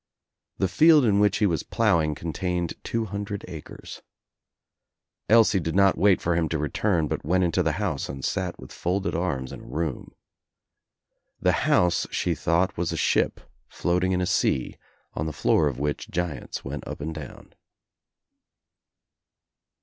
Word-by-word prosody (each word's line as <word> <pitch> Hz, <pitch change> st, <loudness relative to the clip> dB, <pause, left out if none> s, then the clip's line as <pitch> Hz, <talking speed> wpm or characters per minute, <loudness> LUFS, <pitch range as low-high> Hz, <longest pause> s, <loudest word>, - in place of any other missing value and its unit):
The 95 Hz, -, +1 dB
field 150 Hz, -, +5 dB
in 100 Hz, -3 st, +3 dB
which 105 Hz, -1 st, +3 dB
he 105 Hz, -, +2 dB
was 85 Hz, -6 st, +1 dB
ploughing 80 Hz, -2 st, +1 dB
contained 85 Hz, +2 st, -2 dB
two 115 Hz, -1 st, -2 dB
hundred 100 Hz, 0 st, -5 dB
acres. 80 Hz, -4 st, -9 dB, 1.3 s
Elsie 110 Hz, -3 st, +5 dB
did 80 Hz, 0 st, -3 dB
not 100 Hz, -1 st, +5 dB
wait 100 Hz, -1 st, +4 dB
for 85 Hz, 0 st, 0 dB
him 80 Hz, -2 st, 0 dB
to 80 Hz, -, -1 dB
return 80 Hz, +3 st, 0 dB
but -, -, -3 dB
went 90 Hz, +4 st, +2 dB
into 85 Hz, -2 st, +1 dB
the -, -, +1 dB
house 95 Hz, -9 st, -2 dB
and 65 Hz, 0 st, -5 dB
sat 90 Hz, -3 st, -2 dB
with -, -, -11 dB
folded 95 Hz, +3 st, -2 dB
arms 70 Hz, -8 st, -2 dB
in -, -, -8 dB
a -, -, -13 dB
room. 75 Hz, 0 st, -4 dB, 1.2 s
The -, -, +3 dB, 0.2 s
house 90 Hz, -1 st, +3 dB
she -, -, 0 dB
thought 90 Hz, +3 st, +1 dB
was 85 Hz, -1 st, -1 dB
a -, -, -3 dB
ship -, -, +1 dB, 0.3 s
floating 90 Hz, +1 st, 0 dB
in 90 Hz, 0 st, +1 dB
a -, -, +1 dB
sea 65 Hz, -6 st, 0 dB, 0.4 s
on 75 Hz, -, -3 dB
the -, -, -2 dB
floor 75 Hz, +2 st, +2 dB
of 70 Hz, -4 st, -3 dB
which 75 Hz, +1 st, -3 dB
giants 90 Hz, -4 st, -4 dB
went 70 Hz, +2 st, -6 dB
up -, -, -6 dB
and 80 Hz, +2 st, -4 dB
down. 75 Hz, -4 st, -10 dB
85 Hz, 160 wpm, -25 LUFS, 75-95 Hz, 1.3 s, field